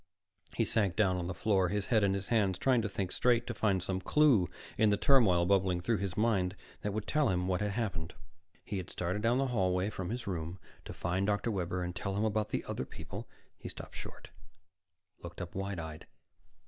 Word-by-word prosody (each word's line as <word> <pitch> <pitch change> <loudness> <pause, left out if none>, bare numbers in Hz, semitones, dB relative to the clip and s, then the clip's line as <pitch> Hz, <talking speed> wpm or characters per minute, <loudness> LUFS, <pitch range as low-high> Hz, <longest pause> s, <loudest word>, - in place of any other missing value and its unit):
He - - +2
sank 100 -5 +1
down 95 -4 +3
on 85 -1 -3
the 95 - -3
floor, 95 -4 +2
his 105 +1 -1
head 110 -2 +5
in 100 -1 +3
his 100 0 -4
hands, 100 -6 +2
trying 125 +2 +3
to 110 - -2
think 95 -2 -3
straight, 120 -1 +2
to 120 - -3
find 100 -5 +1
some 95 0 -2
clue 130 - +4 0.3
in 110 - +4
the 105 - +3
turmoil 100 -10 +5
bubbling 95 -1 +2
through 105 +5 0
his 95 -2 -3
mind 100 -4 +2 0.3
that 105 - -2
would 105 +1 -3
tell 150 -1 +2
him 90 -1 0
what 95 +1 0
had 105 -1 0
happened. 90 -8 -3 0.5
He 100 - -3
had 90 - -5
started 90 +4 -2
down 115 +3 +3
the 135 - +2
hallway 95 -1 +1
from 95 -4 -4
his 120 +1 -4
room, 85 -2 -3 0.3
to - - -6
find 95 +3 -1
Dr. 105 +3 +1
Webber 90 -2 -2
and 90 0 -4
tell 95 +1 -3
him 105 +2 +1
about 110 0 0
the - - -2
other - - -3
people - - -8 0.3
He - - -7
stopped - - -9
short, - - -9 0.9
looked 85 0 -9
up 90 -2 -6
wide 95 0 -3
eyed. 80 -2 -7
100 Hz, 215 wpm, -32 LUFS, 90-110 Hz, 0.9 s, head